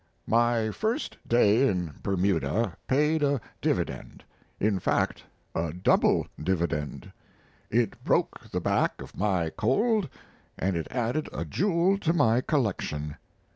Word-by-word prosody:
My 115 -1 +2
first 220 - -2
day 120 +2 +4
in 90 - -1
Bermuda 95 0 0
paid 150 +4 +2
a 140 -2 +2 0.2
dividend - - -2 0.4
in 100 -2 +1
fact - - 0 0.3
a 80 -1 -2
double 90 +1 +3 0.2
dividend: 85 -5 -2 0.6
it 115 -2 0
broke - - 0
the - - -2
back - - +1
of - - -10
my 95 -5 0
cold 190 - +1 0.5
and 95 +1 0
it 80 - -2
added 125 +5 -1
a - - -4
jewel 190 +1 +2
to 165 -3 +1
my 120 -7 +3
collection. 90 - -1
110 Hz, 125 wpm, -27 LUFS, 90-145 Hz, 0.6 s, day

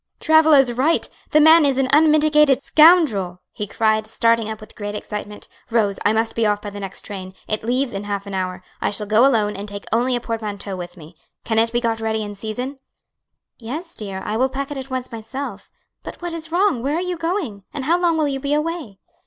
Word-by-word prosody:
"Travilla 315 -1 +5
is 260 -3 +4
right! 280 +7 +1 0.2
the 305 - +4
man 315 +1 +7
is 275 -2 +2
an 270 -1 +2
unmitigated 300 -2 +5
scoundrel!" 290 - +4
he 210 - -5
cried, 215 +1 +1
starting 230 0 +2
up 220 -1 -5
with 215 - -12
great 205 0 -5
excitement. 210 0 -7 0.2
"Rose, 215 -4 +1
I 205 - +3
must 225 +1 0
be 230 - 0
off 210 -1 +2
by 205 0 -7
the 205 - -8
next 195 -1 -6
train; 190 -2 -8
it 215 0 -2
leaves 250 +2 0
in 200 +1 -5
half 200 -1 -3
an 200 - -7
hour. 185 -1 -3 0.2
I - - +1
shall 210 +1 -1
go 215 +5 +5
alone 215 -5 +1
and 205 +1 -5
take 200 0 -7
only 245 +2 +2
a - - 0
portmanteau 210 -4 -4
with 175 0 -8
me. 155 -1 -13 0.3
Can 220 -1 +1
it 230 0 +2
be 240 +1 0
got 225 -1 -1
ready 220 -1 -1
in 205 0 -6
season?" 245 +7 -5 0.8
"Yes, 305 +9 -6
dear, 195 -3 -6
I 215 - -2
will 260 +3 +2
pack 275 +2 -4
it 290 - -4
at 265 0 -8
once 255 -1 -4
myself. 230 +5 -7 0.3
But - - -9
what 350 -1 -5
is 325 -1 -7
wrong? 360 - +2
Where 280 +4 -1
are - - 0
you 360 0 -2
going? 330 - -3
and 285 -3 -5
how 340 +4 +2
long 340 -2 +2
will 310 -2 +1
you 270 -1 -2
be 285 +2 0
away?" 300 - -3
230 Hz, 225 wpm, -21 LUFS, 210-295 Hz, 0.8 s, man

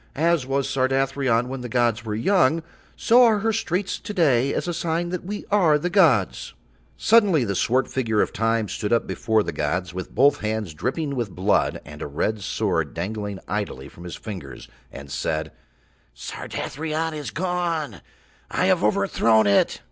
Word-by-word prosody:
As 160 -3 +1
was 135 0 0
Sardathrion 135 -2 +1
when 130 0 -5
the 125 - -6
gods 120 -1 +1
were 105 -2 -3
young, 165 - +2 0.3
so 245 +2 +5
are 225 -3 +5
her 225 +1 +1
streets 195 -2 -2
to 210 - -7
day 140 -6 +3
as - - -2
a 175 - -1
sign 170 +1 -1
that 180 0 -4
we 205 +3 -6
are 175 -7 +4
the 175 +4 -3
gods." 150 - +2 0.4
Suddenly 200 - +4
the 100 - -1
swart 125 +7 +1
figure 115 -5 -1
of - - +1
Time 115 0 0
stood 105 +2 -4
up 115 - +2
before 110 -1 0
the - - -3
gods, 85 +4 -2
with 95 0 -7
both 140 +3 +4
hands 110 -5 -3
dripping 140 - -2
with 120 -5 -2
blood 95 +2 0
and 75 +2 -11
a - - -3
red 105 +9 -2
sword 95 -7 -1
dangling 100 +3 -4
idly 100 -11 -4
from 85 - -14
his 90 - -7
fingers, 95 -11 -8 0.2
and 70 0 -10
said: 80 +2 -2 0.6
"Sardathrion 160 - -4
is 150 -2 -5
gone! 170 - -2 0.5
I - - 0
have - - +2
overthrown 110 +1 +3
it!" 100 -1 +3
125 Hz, 170 wpm, -23 LUFS, 105-160 Hz, 0.6 s, so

